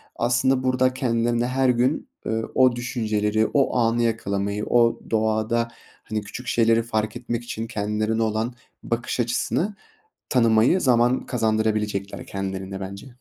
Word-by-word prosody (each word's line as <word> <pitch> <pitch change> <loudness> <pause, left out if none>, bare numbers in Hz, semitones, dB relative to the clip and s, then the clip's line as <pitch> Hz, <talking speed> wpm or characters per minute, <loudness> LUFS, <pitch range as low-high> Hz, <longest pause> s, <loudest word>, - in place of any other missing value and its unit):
aslında 125 +2 +2
burada 130 0 +2
kendilerine 120 -1 0
her 130 0 +1
gün, 125 +4 +1 0.2
ııı, 110 0 -2
o 130 -2 +5
düşünceleri, 110 -3 0
o 140 -3 +2
anı 120 0 +2
yakalamayı, 100 -2 -1
o 115 -1 +3
doğada, 110 +1 +1 0.4
hani, 110 -1 -3
küçük 120 +4 -9
şeyleri 115 -1 +3
fark 110 -1 -2
etmek 120 -1 -4
için 115 -1 -5
kendilerine 110 +1 -1
olan 110 +2 -1 0.3
bakış 120 +2 -2
açısını 160 - -1 0.6
tanımayı 115 +6 +4
zaman 125 -2 +3
kazandırabilecekler 110 -3 -1
kendilerine 95 0 -5
bence. 100 +4 -7
115 Hz, 125 wpm, -24 LUFS, 110-120 Hz, 0.6 s, o